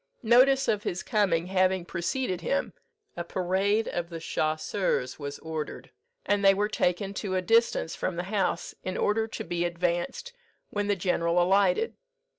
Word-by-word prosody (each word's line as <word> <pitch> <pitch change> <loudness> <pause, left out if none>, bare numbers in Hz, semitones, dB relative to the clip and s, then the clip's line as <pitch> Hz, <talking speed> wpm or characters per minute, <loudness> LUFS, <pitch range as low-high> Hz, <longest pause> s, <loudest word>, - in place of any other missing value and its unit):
"Notice 260 +4 +5
of 210 - +1
his 180 -2 -3
coming 195 -7 +1
having 185 -1 +1
preceded 180 +2 -2
him, 275 +10 -1 0.4
a 170 - -3
parade 190 +5 0
of 170 -1 -3
the 165 -1 -6
chasseurs 155 -3 -1
was 145 -1 -5
ordered, 160 -2 -6 0.3
and 205 0 +1
they 195 0 +6
were 205 +2 +1
taken 195 0 0
to 195 -1 -3
a 185 - +1
distance 225 -5 +2
from 185 - -2
the 175 - -2
house, 195 -3 0
in 185 - -3
order 220 +2 +1
to 220 0 -6
be 175 -4 -2
advanced 175 - -2 0.4
when 205 0 -1
the 205 - +2
general 175 -2 +1
alighted. 195 - +2
185 Hz, 160 wpm, -28 LUFS, 175-210 Hz, 0.4 s, they